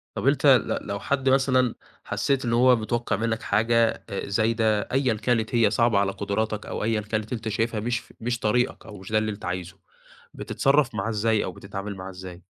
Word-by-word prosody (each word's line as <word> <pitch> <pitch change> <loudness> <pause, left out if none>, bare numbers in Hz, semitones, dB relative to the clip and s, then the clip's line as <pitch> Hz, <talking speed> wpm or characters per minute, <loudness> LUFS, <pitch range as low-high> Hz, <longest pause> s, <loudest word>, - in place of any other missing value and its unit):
طب، - - -2
أنت - - +2
ل - - +3
لو 100 0 -3
حد 135 +4 0
مثلًا 130 -2 +3 0.3
حسّيت 135 -2 -1
إن 115 - 0
هو 125 +1 +5
متوقّع 120 0 -1
منَّك 115 +1 -1
حاجة 115 +2 +2 0.2
زايدة، 110 0 +1
أيًا 130 -2 +2
كانت 110 +1 0
هي 115 -2 +4
صعبة 115 -3 +3
على 100 -1 +1
قدراتَك 105 +2 -2
أو - - -4
أيًا 110 -1 +1
كانت 110 +2 -3
أنت 115 -2 -4
شايفها 110 +1 -1
مش 120 +2 -1
ف - - -18
مش 120 +1 -2
طريقَك 125 +4 0
أو 105 -2 -10
مش 95 +2 -11
ده 110 - +3
اللي 110 0 0
أنت 100 - -8
عايزه، 90 +1 -4 0.6
بتتصرّف 135 -4 +1
معاه 110 +2 -2
إزاي 110 0 +1
أو 95 - -4
بتتعامل 100 +2 -7
معاه 95 0 -7
إزاي؟ 90 -1 -10
110 Hz, 195 wpm, -25 LUFS, 105-120 Hz, 0.6 s, هو